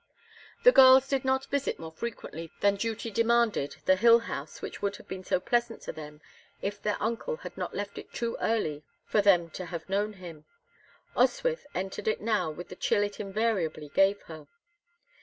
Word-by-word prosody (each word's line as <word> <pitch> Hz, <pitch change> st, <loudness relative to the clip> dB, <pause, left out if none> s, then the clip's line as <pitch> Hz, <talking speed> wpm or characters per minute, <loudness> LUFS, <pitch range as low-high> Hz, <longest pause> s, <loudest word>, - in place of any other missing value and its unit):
The -, -, +9 dB
girls 265 Hz, -, +8 dB
did 270 Hz, -2 st, 0 dB
not 265 Hz, 0 st, +1 dB
visit 280 Hz, 0 st, 0 dB
more 160 Hz, -1 st, -8 dB
frequently 165 Hz, -4 st, -6 dB
than 200 Hz, 0 st, +4 dB
duty 225 Hz, +2 st, -3 dB
demanded 230 Hz, -8 st, +2 dB
the 185 Hz, -, +5 dB
hill 230 Hz, +4 st, +7 dB
house 155 Hz, -10 st, -6 dB
which -, -, -7 dB
would 200 Hz, 0 st, -1 dB
have -, -, -14 dB
been 185 Hz, 0 st, -6 dB
so -, -, +1 dB
pleasant 235 Hz, +2 st, -1 dB
to -, -, -4 dB
them 150 Hz, -1 st, -10 dB, 0.4 s
if 205 Hz, +1 st, -4 dB
their 210 Hz, -1 st, 0 dB
uncle 235 Hz, -, -2 dB
had -, -, -7 dB
not -, -, -5 dB
left 200 Hz, 0 st, -4 dB
it -, -, -12 dB
too 235 Hz, -1 st, -3 dB
early 155 Hz, -10 st, 0 dB, 0.2 s
for 210 Hz, -, +2 dB
them 175 Hz, -5 st, +4 dB
to 185 Hz, -, -6 dB
have 170 Hz, -1 st, -6 dB
known 205 Hz, +2 st, 0 dB
him. 170 Hz, -6 st, -11 dB, 0.7 s
Oswyth 485 Hz, -10 st, +1 dB
entered 190 Hz, +3 st, -4 dB
it 215 Hz, -, +1 dB
now 215 Hz, -6 st, 0 dB
with 165 Hz, +3 st, -8 dB
the -, -, -8 dB
chill 205 Hz, -, +1 dB
it 205 Hz, 0 st, -4 dB
invariably 195 Hz, -7 st, -1 dB
gave 195 Hz, +6 st, +3 dB
her. 155 Hz, -2 st, -11 dB
205 Hz, 185 wpm, -29 LUFS, 175-230 Hz, 0.7 s, The